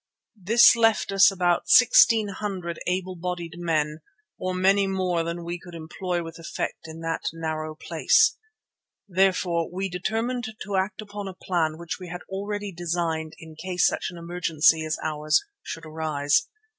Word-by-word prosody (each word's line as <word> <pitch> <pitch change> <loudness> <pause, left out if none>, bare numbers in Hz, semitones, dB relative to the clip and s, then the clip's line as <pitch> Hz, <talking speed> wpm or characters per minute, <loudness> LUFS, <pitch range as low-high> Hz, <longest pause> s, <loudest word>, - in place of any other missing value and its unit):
This 230 +6 +7
left 225 -3 +2
us 195 0 +7
about 180 -3 0
sixteen 225 -3 +6
hundred 190 -4 -5
able 185 +1 -1
bodied 175 -1 -5
men 155 -3 -1 0.4
or 185 0 -2
many 195 +2 +3
more 185 -3 0
than 170 +1 -4
we 175 +1 -5
could 175 -1 -12
employ 175 +2 -3
with 165 0 -9
effect 165 -1 -5
in 160 +1 -9
that 165 0 -3
narrow 155 -1 -4
place. 430 - +3 0.7
Therefore 180 -3 +1
we 190 +2 -3
determined 220 +5 -2
to 205 - -4
act 190 +2 -1
upon 205 -1 -7
a 190 - -7
plan 160 -5 -1
which 170 -1 -6
we 180 - -8
had 180 +1 -7
already 205 +1 -4
designed 165 -2 -2
in 160 -1 -12
case 180 +2 0
such - - 0
an 175 - -10
emergency 165 -2 +2
as 155 0 -2
ours 155 - +1 0.2
should 165 - -7
arise. 155 +4 0
175 Hz, 155 wpm, -25 LUFS, 165-195 Hz, 0.7 s, This